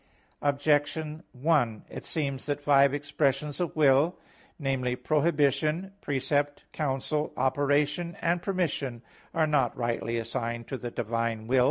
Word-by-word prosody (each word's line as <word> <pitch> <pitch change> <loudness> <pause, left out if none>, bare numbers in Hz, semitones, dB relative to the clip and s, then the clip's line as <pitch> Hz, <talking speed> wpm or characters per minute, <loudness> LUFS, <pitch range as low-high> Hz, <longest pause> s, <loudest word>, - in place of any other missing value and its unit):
Objection 145 +2 +1
1: 125 -5 +1
It - - -8
seems 140 -4 -2
that 145 0 -1
five 140 -1 +5
expressions 145 0 -1
of 175 -2 -2
will 150 +3 +4 0.4
namely, 130 -4 0
prohibition, 150 +4 +1
precept, 145 +1 0
counsel, 150 +1 -1
operation, 145 +5 +1
and 170 +1 +1
permission 150 - -2 0.3
are 160 -1 +2
not 145 -6 +1
rightly 120 -1 -1
assigned 115 +1 -3
to - - -4
the 125 -2 -5
divine 115 -1 -2
will. 130 +3 +3
145 Hz, 125 wpm, -28 LUFS, 125-150 Hz, 0.4 s, five